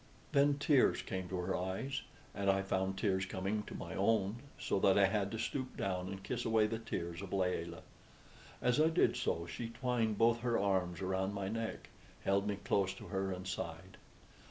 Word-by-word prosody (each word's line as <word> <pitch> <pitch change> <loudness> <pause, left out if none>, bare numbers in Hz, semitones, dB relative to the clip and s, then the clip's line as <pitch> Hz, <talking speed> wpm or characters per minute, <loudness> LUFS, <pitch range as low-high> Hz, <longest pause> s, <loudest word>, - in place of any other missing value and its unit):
Then 140 0 +4
tears 145 -2 +4
came 95 -1 -4
to 95 - -2
her 90 +1 -1
eyes, 95 +10 -2 0.3
and 100 -1 0
I 95 0 +3
found 95 0 -1
tears 95 -1 +1
coming 100 +3 -1
to - - -7
my - - -6
own, 100 +1 +2 0.2
so - - 0
that 95 0 +5
I 100 - +7
had 100 0 +1
to 110 - -3
stoop 130 +3 -3
down 90 -1 -1
and 95 0 -6
kiss - - -2
away 110 -1 +4
the 110 +1 -2
tears 85 -6 -4
of 100 - -7
Layelah. 90 -3 -1 0.8
As 125 +4 +4
I 160 - +5
did 165 - +3
so 85 - -1
she 115 +7 -5
twined 115 -3 0
both 115 +1 +4
her 120 -1 +1
arms 95 -3 +1
around 95 +1 -1
my 100 -1 -2
neck, 115 +1 -4 0.3
held 100 +1 +2
me 105 - 0
close 95 -1 0
to - - -10
her, 95 -1 -1
and 95 0 -5
sighed. 95 0 -5
100 Hz, 195 wpm, -35 LUFS, 95-115 Hz, 0.8 s, I